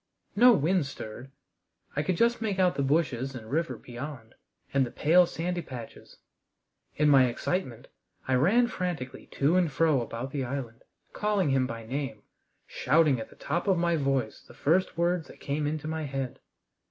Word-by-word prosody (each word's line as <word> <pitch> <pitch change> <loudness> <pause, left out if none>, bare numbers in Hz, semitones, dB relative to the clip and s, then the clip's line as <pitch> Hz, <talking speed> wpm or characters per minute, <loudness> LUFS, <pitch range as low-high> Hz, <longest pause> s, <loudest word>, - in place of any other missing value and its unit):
No 245 +4 +8
wind 170 -2 +2
stirred. 120 -1 -8 0.7
I 145 - +1
could 180 +2 -1
just 235 +2 +2
make 210 -4 -1
out 185 -1 +3
the - - -2
bushes 135 -3 0
and 110 -2 -9
river 165 +3 -1
beyond, 120 -1 -8 0.4
and 140 -1 +4
the 125 - -3
pale 175 +7 +4
sandy 175 +2 -3
patches. 120 -7 -10 0.8
In 150 - +2
my 135 -3 +7
excitement 125 0 -3 0.4
I 130 - +1
ran 190 - +4
frantically 175 - -4
to 145 +5 +2
and 175 -4 +2
fro 150 -1 +2
about 120 +3 -5
the 140 -1 -2
island, 125 -2 -5 0.3
calling 205 -8 +1
him 130 -1 +2
by 115 -2 -7
name, 135 +3 -4 0.4
shouting 155 -5 +2
at 110 - -7
the - - -17
top 175 +4 -3
of 190 -2 +3
my 170 0 +2
voice 135 -6 -1
the - - -17
first 170 +4 +1
words 170 -1 +1
that - - -14
came 145 +1 -2
into 155 0 -3
my 160 0 -3
head. 135 -2 -4
145 Hz, 175 wpm, -28 LUFS, 130-175 Hz, 0.8 s, No